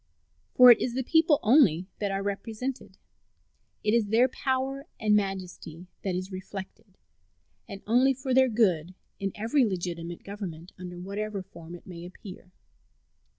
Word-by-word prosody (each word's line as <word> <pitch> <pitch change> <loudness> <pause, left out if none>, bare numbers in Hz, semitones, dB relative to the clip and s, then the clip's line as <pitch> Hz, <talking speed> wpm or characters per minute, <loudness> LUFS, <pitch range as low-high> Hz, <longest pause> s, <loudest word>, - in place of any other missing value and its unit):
For 250 -1 +10
it 235 - +5
is 245 -1 -2
the 260 - -1
people 320 +1 +3
only 210 - +5
that 205 - -1
are 195 0 -2
represented. 220 +6 -5 0.9
It 210 - +2
is 230 -3 +2
their 230 +5 +4
power 265 +2 -2
and 210 -1 +3
majesty 185 -4 -3 0.2
that 190 -2 -1
is 185 +2 -4
reflected, 190 +1 -9 0.7
and 200 0 -8
only 255 +5 +3
for 265 0 -3
their 260 0 +5
good, 185 -7 +1 0.2
in 195 0 -2
every 230 +6 +2
legitimate 175 -4 -3
government, 185 -4 -7
under 180 -1 -8
whatever 200 +1 -4
form 170 -3 -11
it 175 - -14
may 170 -2 -9
appear. 185 0 -11
200 Hz, 150 wpm, -27 LUFS, 185-245 Hz, 0.9 s, For